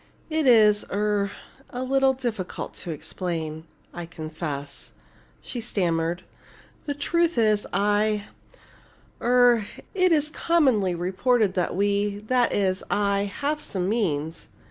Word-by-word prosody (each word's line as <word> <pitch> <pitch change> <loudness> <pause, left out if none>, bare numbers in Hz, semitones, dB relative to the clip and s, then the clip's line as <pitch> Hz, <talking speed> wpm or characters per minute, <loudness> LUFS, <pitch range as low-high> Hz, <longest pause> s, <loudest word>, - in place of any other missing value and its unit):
"It 310 -2 +1
is 215 -4 +6
er 205 -1 0 0.4
a 250 +1 -4
little 270 0 +3
difficult 235 -8 -4
to - - -6
explain, 160 0 -4 0.3
I 175 -1 -6
confess," 155 -4 -6 0.5
she 240 - -5
stammered. 175 -6 -1 0.6
"The 285 - -1
truth 335 +2 +1
is 215 -2 +2
I 210 +1 +1 1.0
er 245 -3 +4 0.3
it 370 -2 +3
is 305 -1 +2
commonly 260 - +2
reported 195 +4 +1
that 180 -2 -1
we 200 +1 +1
that 250 -1 +3
is 190 -2 +1
I 200 -1 +1 0.2
have 300 +2 0
some 185 -8 -2
means. 165 -8 -1
205 Hz, 120 wpm, -25 LUFS, 180-250 Hz, 1.0 s, is